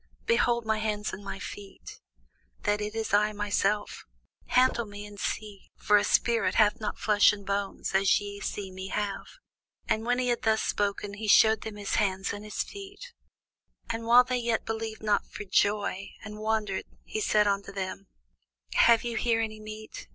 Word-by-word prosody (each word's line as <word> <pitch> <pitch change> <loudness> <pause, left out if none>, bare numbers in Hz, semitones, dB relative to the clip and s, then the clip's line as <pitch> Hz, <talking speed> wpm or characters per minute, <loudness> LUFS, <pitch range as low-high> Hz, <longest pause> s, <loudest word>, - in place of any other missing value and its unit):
Behold 240 - +2
my 220 0 +1
hands 210 -1 -2
and 195 - -7
my 195 - -5
feet, 200 0 -9 0.6
that 205 0 +1
it 210 +1 -4
is 225 -2 -3
I 210 +1 +3
myself: 205 0 -1 0.4
handle 250 -2 +3
me, 205 0 -8
and 205 -1 -11
see; 205 -1 -4
for 210 - +3
a 205 - +2
spirit 235 -1 +2
hath 215 +1 +3
not 210 - -3
flesh 210 -1 +5
and 200 -1 -8
bones, 200 0 -2
as 195 0 +4
ye 205 0 -7
see 200 -2 -4
me 190 +1 -7
have. 200 0 -3 0.6
And 220 - 0
when 245 +1 +1
he 250 -1 0
had 240 - 0
thus 220 -1 +2
spoken, 205 0 -1
he 215 +1 -5
shewed 220 +1 +6
them 220 -1 -6
his 205 -1 -2
hands 195 -2 0
and 205 +1 -7
his 210 -1 -3
feet. 405 +4 -10 0.8
And 230 0 -4
while 245 +2 +8
they 255 0 -1
yet 235 -2 -1
believed 220 -1 -4
not 210 -1 +1
for - - -7
joy, 200 -1 0
and 210 0 -8
wondered, 215 -3 -1 0.2
he 215 - -4
said 210 0 +3
unto 200 -1 -1
them, 195 0 -5 0.7
Have 235 -1 +5
ye 240 -1 -3
here 230 0 +1
any 215 -1 -3
meat? 215 0 -9
210 Hz, 180 wpm, -28 LUFS, 205-225 Hz, 0.8 s, while